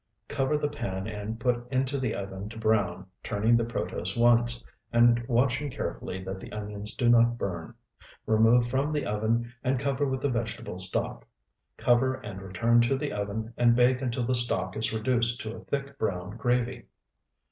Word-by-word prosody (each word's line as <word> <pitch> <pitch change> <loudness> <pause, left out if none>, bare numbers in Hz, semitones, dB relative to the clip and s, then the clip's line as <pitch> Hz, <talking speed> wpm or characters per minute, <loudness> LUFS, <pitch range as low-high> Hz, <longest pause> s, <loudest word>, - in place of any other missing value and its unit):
Cover 135 +2 0
the 150 - 0
pan 95 -10 -4
and 110 +1 -5
put 120 +1 -1
into 135 +1 0
the 130 -4 -1
oven 100 +1 -5
to 115 - -10
brown, 110 -3 +1 0.2
turning 110 +3 +2
the 115 - +3
protose 95 -4 -3
once, 120 0 +3 0.3
and 120 0 +5
watching 130 +3 +1
carefully 95 - -5
that 95 0 -5
the - - -10
onions 105 0 -5
do 120 - +1
not 120 0 +5
burn. 85 -7 -4 0.5
Remove 115 +2 +4
from 135 +4 0
the 150 -1 -1
oven 115 +3 0
and 130 +1 +1
cover 140 +2 0
with 130 -1 -2
the 140 - +1
vegetable 115 -6 -3
stock. 90 -9 -1 0.5
Cover 125 +2 +3
and 105 -7 -8
return 115 +6 +3
to 120 +3 +2
the - - -3
oven, 105 +3 -3
and 120 -1 +5
bake 125 +1 +4
until 125 -1 -1
the 130 - +1
stock 120 -1 +1
is 110 - 0
reduced 120 +1 +1
to 110 0 -5
a - - -10
thick, 140 0 -4
brown 95 -1 -2
gravy. 120 +1 0
120 Hz, 175 wpm, -28 LUFS, 105-125 Hz, 0.5 s, and